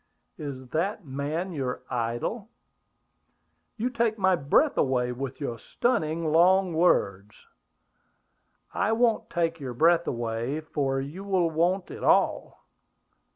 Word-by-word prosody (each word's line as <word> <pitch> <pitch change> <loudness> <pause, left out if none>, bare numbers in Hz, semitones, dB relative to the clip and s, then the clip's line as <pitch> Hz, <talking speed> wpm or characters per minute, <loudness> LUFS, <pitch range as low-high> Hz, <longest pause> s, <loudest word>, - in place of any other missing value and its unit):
"Is 130 -4 -7
that 180 - -2
man 145 +7 -3
your 130 -6 -4
idol?" 120 -1 -3 1.3
"You 245 +4 -1
take 230 -2 0
my 190 -2 +3
breath 175 - +2
away 125 -2 +1
with 130 +1 -5
your 120 -6 -4
stunning 160 - -1
long 180 +2 +4
words!" 105 - +1 1.4
"I 215 +3 +1
won't 230 -1 +1
take 165 -1 -1
your 130 -4 -6
breath 170 +5 +3
away, 120 +4 -2
for 135 -3 -1
you 145 +8 -6
will 185 -4 +1
want 175 +4 0
it - - -8
all. - - +1
160 Hz, 120 wpm, -27 LUFS, 130-185 Hz, 1.4 s, long